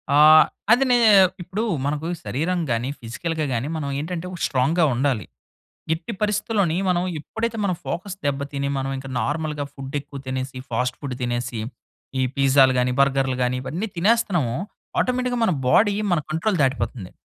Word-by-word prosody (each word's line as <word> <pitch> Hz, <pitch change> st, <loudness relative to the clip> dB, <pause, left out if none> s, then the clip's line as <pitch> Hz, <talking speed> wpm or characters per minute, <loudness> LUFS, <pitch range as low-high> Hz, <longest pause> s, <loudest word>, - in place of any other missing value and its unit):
ఆహ్, 155 Hz, +1 st, +9 dB, 0.3 s
అదినేనే 245 Hz, -2 st, +5 dB, 0.4 s
ఇప్పుడు 185 Hz, +6 st, -3 dB, 0.2 s
మనకు 150 Hz, +3 st, -2 dB, 0.2 s
శరీరం 175 Hz, +7 st, -1 dB
గాని, 120 Hz, +3 st, 0 dB
ఫిజికల్‌గా 155 Hz, +7 st, -3 dB
గాని 120 Hz, +4 st, -1 dB
మనం 140 Hz, -2 st, -3 dB
ఏంటంటే 175 Hz, +3 st, -4 dB, 0.2 s
స్ట్రాంగ్‌గా 145 Hz, +6 st, +2 dB
ఉండాలి. 125 Hz, -5 st, 0 dB, 0.7 s
ఎట్టి 165 Hz, +8 st, -6 dB
పరిస్థితుల్లోని 210 Hz, -4 st, +1 dB
మనం 175 Hz, -1 st, +2 dB, 0.2 s
ఎప్పుడైతే 225 Hz, +7 st, -3 dB
మనం 185 Hz, -3 st, +1 dB
ఫోకస్ 185 Hz, +3 st, -4 dB
దెబ్బ 140 Hz, 0 st, 0 dB
తిని 140 Hz, 0 st, -2 dB
మనమీంకా 135 Hz, 0 st, -3 dB
నార్మల్‌గా 150 Hz, +3 st, -2 dB
ఫుడేక్కువ 140 Hz, +1 st, -6 dB
తినేసి, 130 Hz, 0 st, -4 dB
ఫాస్ట్ 125 Hz, +2 st, -1 dB
ఫుడ్ 135 Hz, -4 st, -4 dB
తినేసి, 120 Hz, -1 st, -2 dB, 0.6 s
ఈ -, -, +2 dB
పిజ్జాలు 135 Hz, -1 st, +5 dB
గాని, 125 Hz, 0 st, +2 dB
బర్గర్‌‌లు 135 Hz, -1 st, +2 dB
గాని 125 Hz, +1 st, +1 dB
ఇవన్నీ 180 Hz, +11 st, -3 dB
తినేస్తున్నామో 175 Hz, -, +2 dB, 0.4 s
ఆటోమేటిక్‌గా 250 Hz, -1 st, 0 dB
మన 185 Hz, -, +2 dB, 0.2 s
బాడీ 205 Hz, -, +4 dB, 0.2 s
మన 170 Hz, -, +3 dB
కంట్రోల్ 175 Hz, +4 st, 0 dB
దాటిపోతుంది. 130 Hz, -7 st, -1 dB
145 Hz, 140 wpm, -23 LUFS, 130-180 Hz, 0.7 s, ఆహ్